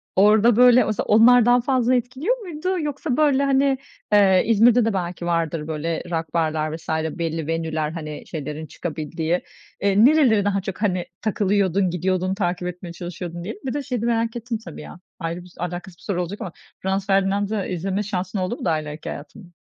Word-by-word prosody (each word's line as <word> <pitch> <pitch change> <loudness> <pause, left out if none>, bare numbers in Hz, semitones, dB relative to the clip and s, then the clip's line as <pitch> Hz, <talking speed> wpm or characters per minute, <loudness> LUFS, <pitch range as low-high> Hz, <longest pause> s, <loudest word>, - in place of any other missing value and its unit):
orada, 210 +3 +5
böyle, 250 0 +7
mesela 215 -2 -2
onlar 230 +2 +6
daha 245 0 +5
fazla 255 -1 +2
etkiliyor 260 - -1
muydu 365 -2 -3
yoksa, 295 -2 -2
böyle, 280 -3 +3
hani, 275 0 +2 0.4
eee, 195 -3 +5
İzmir'de 230 +1 +5
de 225 - 0
belki 175 -2 -3
vardır 165 -2 -1
böyle 160 +1 -3
rock 160 -2 -3
barlar 155 -2 0
vs. 165 - -11
belli 160 0 -2
venue'ler, 160 -2 -2
hani, 155 -2 -6
şeylerin 150 0 -5
çıkabildiği. 160 +1 -3 0.4
Eee, 200 +3 +4
nereleri 255 -9 +4
daha 195 -1 +1
çok, 195 +2 -6
hani, 185 -4 0 0.2
takılıyordun, 200 -3 +1
gidiyordun, 185 +2 0
takip 180 -2 -2
etmeye 180 -1 -7
çalışıyordun, 175 -1 -6
diyelim. 210 +2 -7
Bir 260 - -2
de 290 - -2
şeyi 250 -3 -3
merak 230 0 0
ettim 235 0 -3
tabii 170 -4 -8
ya, 175 - -11 0.2
ayrı 170 +2 -4
bir 180 - -16
alakasız 175 0 -5
bir - - -21
soru 185 -4 -1
olacak 180 +4 -5
ama 180 - -5 0.3
Franz 190 +1 -1
Ferdinand'ı 195 +1 +1
izleme 190 +3 -2
şansın 190 -1 -3
oldu 185 +6 -2
mu 255 - -7
daha 155 -1 +2
ileriki 150 +1 -7
hayatında? 175 +6 -9
190 Hz, 180 wpm, -22 LUFS, 170-230 Hz, 0.4 s, böyle